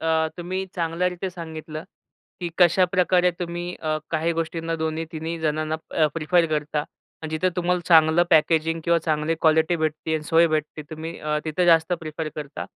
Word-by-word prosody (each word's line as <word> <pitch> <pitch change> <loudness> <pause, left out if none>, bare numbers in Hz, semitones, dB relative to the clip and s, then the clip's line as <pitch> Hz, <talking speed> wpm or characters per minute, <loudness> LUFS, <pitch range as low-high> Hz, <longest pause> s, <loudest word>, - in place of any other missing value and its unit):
अ, 160 0 +1
तुम्ही 185 +2 -3
चांगल्यारीती 180 +2 -1
सांगितलं, 160 -2 -7 0.6
की 175 - -2
कशाप्रकारे 180 0 +4
तुम्ही 175 0 -4
अ, 155 0 0
काही 165 +1 0
गोष्टींना 165 0 -3
दोन्ही, 160 +1 -2
तिन्ही 160 +1 -4
जणांना 155 0 -1
अ, 155 -2 +3
प्रिफर 165 +2 +2
करता 150 -1 -1 0.4
आणि 160 - -4
जिथं 185 +3 +2
तुम्हाला 180 0 +1
चांगलं 160 0 +6
पॅकेजिंग 160 +1 +3
किंवा 170 0 +3
चांगली 155 +1 +1
क्वालिटी 160 +2 +3
भेटते 155 0 -2
आणि 155 - -1
सोय 165 +2 +4
भेटते 155 -1 -2
तुम्ही 160 +1 -6
अ, 150 0 -1
तिथं 160 +3 0
जास्त 165 0 +4
प्रिफर 155 0 -5
करता 145 -1 -6
160 Hz, 160 wpm, -24 LUFS, 155-175 Hz, 0.6 s, चांगलं